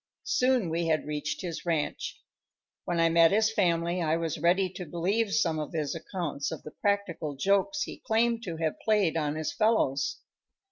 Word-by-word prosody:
Soon 250 Hz, -9 st, +2 dB
we 165 Hz, +1 st, 0 dB
had 155 Hz, -1 st, +1 dB
reached 150 Hz, 0 st, -3 dB
his 170 Hz, -3 st, -5 dB
ranch. 165 Hz, -4 st, -2 dB, 0.7 s
When 175 Hz, -1 st, -1 dB
I 165 Hz, -, +5 dB
met 165 Hz, 0 st, +6 dB
his 220 Hz, +2 st, +3 dB
family 170 Hz, -3 st, +1 dB
I 160 Hz, 0 st, +1 dB
was 165 Hz, -3 st, -3 dB
ready 180 Hz, +4 st, +3 dB
to 180 Hz, 0 st, -7 dB
believe 195 Hz, +7 st, 0 dB
some 170 Hz, -7 st, +1 dB
of 150 Hz, -, -5 dB
his 150 Hz, -3 st, -1 dB
accounts 165 Hz, -4 st, -4 dB
of -, -, -6 dB
the 155 Hz, -, -9 dB
practical 195 Hz, -7 st, -1 dB
jokes 200 Hz, -, +1 dB
he -, -, -7 dB
claimed 230 Hz, +1 st, +1 dB
to 170 Hz, -3 st, -4 dB
have 160 Hz, -1 st, -2 dB
played 210 Hz, -7 st, +2 dB
on 150 Hz, -2 st, 0 dB
his 155 Hz, -1 st, -3 dB
fellows. 215 Hz, -12 st, +1 dB
170 Hz, 180 wpm, -28 LUFS, 155-200 Hz, 0.7 s, met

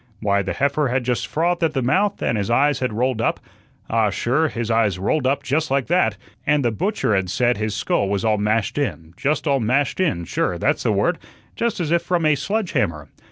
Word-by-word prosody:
Why, 100 Hz, -2 st, +1 dB
the 95 Hz, -, -3 dB
heifer 140 Hz, +1 st, +1 dB
had 125 Hz, +1 st, 0 dB
just 125 Hz, 0 st, -1 dB
frothed 170 Hz, +2 st, 0 dB
at 155 Hz, -2 st, +1 dB
the 130 Hz, -, 0 dB
mouth, 195 Hz, +10 st, +1 dB
and -, -, +1 dB
his 100 Hz, -1 st, -2 dB
eyes 140 Hz, +4 st, +3 dB
had 130 Hz, -2 st, -1 dB
rolled 120 Hz, +1 st, 0 dB
up -, -, 0 dB, 0.5 s
ah, 110 Hz, -2 st, +2 dB
sure, 130 Hz, -, +1 dB
his 120 Hz, -5 st, -3 dB
eyes 110 Hz, -5 st, +2 dB
rolled 130 Hz, +9 st, 0 dB
up 140 Hz, +1 st, 0 dB
just 150 Hz, +3 st, 0 dB
like 135 Hz, -1 st, +1 dB
that 110 Hz, -, +2 dB, 0.3 s
and 145 Hz, -2 st, +2 dB
the 120 Hz, -, +2 dB
butcher 185 Hz, -, -1 dB
had 95 Hz, -1 st, 0 dB
said 120 Hz, +5 st, +1 dB
his 110 Hz, -1 st, -2 dB
skull 100 Hz, -1 st, 0 dB
was 100 Hz, +1 st, -1 dB
all 110 Hz, -1 st, +2 dB
mashed 105 Hz, +5 st, 0 dB
in 85 Hz, -, -3 dB
just 145 Hz, -, -1 dB
all 140 Hz, -3 st, +2 dB
mashed 130 Hz, +8 st, 0 dB
in, 90 Hz, -, 0 dB
sure, -, -, -1 dB
that's -, -, 0 dB
the -, -, +1 dB
word -, -, +1 dB, 0.4 s
just 235 Hz, -4 st, -1 dB
as 165 Hz, -3 st, -2 dB
if 170 Hz, 0 st, +3 dB
from 170 Hz, -1 st, 0 dB
a 155 Hz, -, +5 dB
sledge 200 Hz, +6 st, -2 dB
hammer. 80 Hz, -, -1 dB
130 Hz, 225 wpm, -21 LUFS, 110-155 Hz, 0.5 s, a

